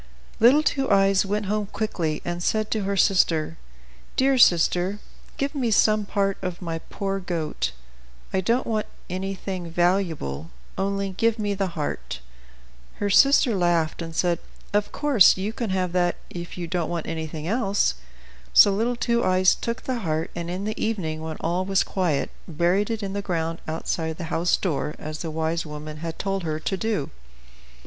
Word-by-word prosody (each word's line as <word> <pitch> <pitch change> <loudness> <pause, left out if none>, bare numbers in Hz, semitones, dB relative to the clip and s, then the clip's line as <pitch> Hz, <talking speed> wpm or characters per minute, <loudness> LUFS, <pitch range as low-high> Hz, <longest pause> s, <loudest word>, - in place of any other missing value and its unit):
Little 260 +7 +6
Two 270 -3 +1
Eyes 195 -1 +4
went 205 +1 -1
home 210 +1 -1
quickly, 170 -8 -2
and 175 0 -3
said 215 +3 0
to 215 -3 0
her 200 0 -1
sister, 165 -4 +2 0.6
"Dear 270 +1 +3
sister, 180 0 +4 0.4
give 280 +2 -1
me 260 -5 0
some 215 -1 +3
part 195 -1 0
of 180 -1 -4
my 165 -3 -4
poor 195 +3 -3
goat. 170 -4 -2 0.6
I 190 - +2
don't 235 +7 +1
want 215 -2 -1 0.2
anything 185 -1 -4
valuable; 165 - 0 0.3
only 195 0 -1
give 225 +4 +1
me 205 -2 -1
the 190 -4 -3
heart." 145 - -3 0.8
Her 205 0 -1
sister 275 +2 +6
laughed, 170 -3 +1
and 165 -1 -6
said: 175 -1 +1 0.3
"Of 205 0 +1
course 280 - +5
you 200 +4 -2
can 230 -2 -3
have 185 -2 0
that 175 -1 +2 0.2
if 175 0 -7
you 175 - -3
don't 170 -1 -2
want 170 -2 -3
anything 160 -1 -4
else." 205 - +1 0.6
So 200 - +9
little 230 +5 0
Two 235 0 +1
Eyes 185 0 +4
took 235 +2 -4
the 255 -2 -2
heart; 160 -5 -2
and 170 0 -4
in 185 +3 -3
the 215 - -3
evening, 165 -8 -2
when 160 -1 -5
all 175 +3 0
was 195 0 +2
quiet, 175 -7 -1 0.2
buried 175 +5 +1
it 225 -2 -2
in 195 -1 -3
the 200 - -2
ground 165 -3 -2
outside 160 0 -2
the 165 -3 -5
house 175 +2 +2
door, 150 -4 -2
as 155 0 -6
the 165 - -4
wise 160 +1 -1
woman 150 0 -7
had 165 +1 -5
told 195 0 -1
her 155 -2 -2
to 195 - -2
do. 205 -6 -2
185 Hz, 175 wpm, -24 LUFS, 165-205 Hz, 0.8 s, So